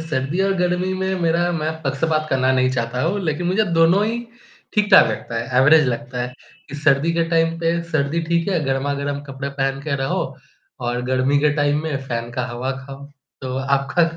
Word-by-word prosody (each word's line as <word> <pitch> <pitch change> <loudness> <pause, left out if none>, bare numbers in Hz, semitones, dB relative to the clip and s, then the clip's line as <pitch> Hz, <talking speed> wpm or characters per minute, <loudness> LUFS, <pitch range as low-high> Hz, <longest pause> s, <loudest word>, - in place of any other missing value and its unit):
सर्दी 155 +1 -2
और 195 0 +2
गर्मी 180 +1 0
में 190 0 -1
मेरा 170 +1 +2
मैं 155 -2 -1
पक्षपात 155 +3 0
करना 130 0 +2
नहीं 130 0 +2
चाहता 120 -1 -2
हूँ, 180 +6 0
लेकिन 160 +2 -1
मुझे 205 +4 +2
दोनों 175 +5 +5
ही 230 +2 -1 0.6
ठीक-ठाक 210 -1 +6
लगता 115 - -4
है, 125 +2 +1
एवरेज 150 +2 +6
लगता 125 0 -3
है 125 +1 -5 0.4
कि 145 - -8
सर्दी 150 +2 +2
के 165 0 +1
टाइम 165 0 +2
पे 170 0 0
सर्दी 155 +1 0
ठीक 170 +1 +1
है, 180 -4 +1
गरमा-गरम 140 +1 -1
कपड़े 135 +1 -5
पहन 135 -1 -2
के 145 -2 -1
रहो। 135 - 0 0.6
और 120 0 -2
गर्मी 130 +3 +1
के 150 0 +3
टाइम 145 0 +1
में 155 -3 -2
फैन 115 0 -3
का 125 +1 -2
हवा 125 +2 -3
खाओ। 140 +1 -10 0.4
तो 130 -1 -4
आपका 140 +4 +1
145 Hz, 190 wpm, -21 LUFS, 130-165 Hz, 0.6 s, ठीक-ठाक